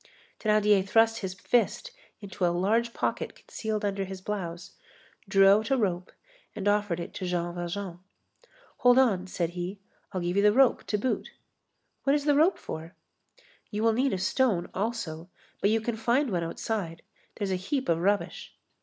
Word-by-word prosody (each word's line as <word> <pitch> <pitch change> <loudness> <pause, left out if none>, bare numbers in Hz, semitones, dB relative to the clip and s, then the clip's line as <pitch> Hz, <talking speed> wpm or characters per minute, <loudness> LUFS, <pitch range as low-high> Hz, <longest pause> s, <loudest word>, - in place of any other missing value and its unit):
Thénardier 210 -2 +3
thrust 225 +3 +3
his 190 -2 -4
fist 245 - 0 0.3
into 195 -2 -6
a - - +5
large 210 +7 +1
pocket - - -2
concealed 215 -1 -4
under 195 -1 -1
his 190 0 -7
blouse, 180 -4 -5 0.6
drew 195 -1 +6
out 215 +4 +4
a 270 - +3
rope 185 -5 -1 0.4
and 205 -1 -3
offered 205 -4 +1
it 170 +3 -6
to 185 - -5
Jean 175 -1 -1
Valjean. 175 +1 -5 0.8
"Hold 245 0 +5
on," 200 -8 +3
said 175 -2 -2
he, 180 +3 -5 0.3
"I'll 185 - -3
give 175 +2 -1
you - - +5
the 210 0 +5
rope 265 +1 +4
to 210 - 0
boot." 250 +5 -2 0.7
"What 275 +1 +3
is 290 -1 -1
the 295 - +4
rope 320 +7 +4
for?" 160 +2 -7 0.7
"You 210 0 -2
will 225 -1 +4
need 260 +4 +1
a - - 0
stone 200 -1 +1
also, 190 -6 -3 0.3
but 200 - +3
you 225 +1 +3
can 225 +1 -3
find 245 +4 +1
one 175 -2 0
outside. 170 0 -4 0.3
There's 200 -3 -2
a - - +2
heap 260 +9 -2
of 165 -1 +2
rubbish." 200 +3 -1
200 Hz, 175 wpm, -28 LUFS, 180-225 Hz, 0.8 s, drew